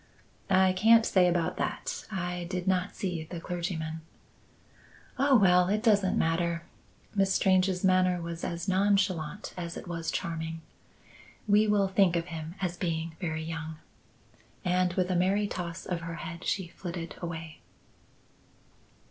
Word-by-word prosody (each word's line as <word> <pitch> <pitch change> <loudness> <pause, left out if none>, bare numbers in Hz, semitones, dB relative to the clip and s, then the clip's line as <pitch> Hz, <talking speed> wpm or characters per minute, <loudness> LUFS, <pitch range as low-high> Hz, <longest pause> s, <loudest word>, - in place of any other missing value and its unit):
"I 190 -1 +5
can't 225 +4 +6
say 185 -2 +4
about 175 -1 0
that; - - -3
I 180 -2 -3
did 180 0 -3
not 185 0 +1
see 175 -5 -3
the 170 +1 -7
clergyman." 165 -2 -4 1.2
"Oh, 275 -1 +5
well! 180 -3 +5
it 215 +2 0
doesn't 200 -5 +3
matter." 170 +1 0 0.5
Miss 195 -2 +2
Strange's 185 -1 +2
manner 185 -1 +3
was 170 0 -6
as 170 +2 -3
nonchalant 190 -2 +1
as 170 -2 -5
it - - -8
was 165 -1 -3
charming. 165 -1 -3 0.9
"We 210 +1 +5
will 205 -2 +3
think 190 -2 +3
of 170 -1 0
him 160 +1 -6
as 180 -2 -2
being 165 -2 -2
very 160 -4 -3
young." 160 0 -5 0.9
And 180 0 +2
with 185 0 0
a - - +1
merry 195 +4 +2
toss 175 -4 -5
of 175 -2 -3
her 165 0 -5
head 170 +1 -7
she 190 -3 -1
flitted 170 -1 -6
away. 165 -2 -6
180 Hz, 145 wpm, -29 LUFS, 165-190 Hz, 1.2 s, can't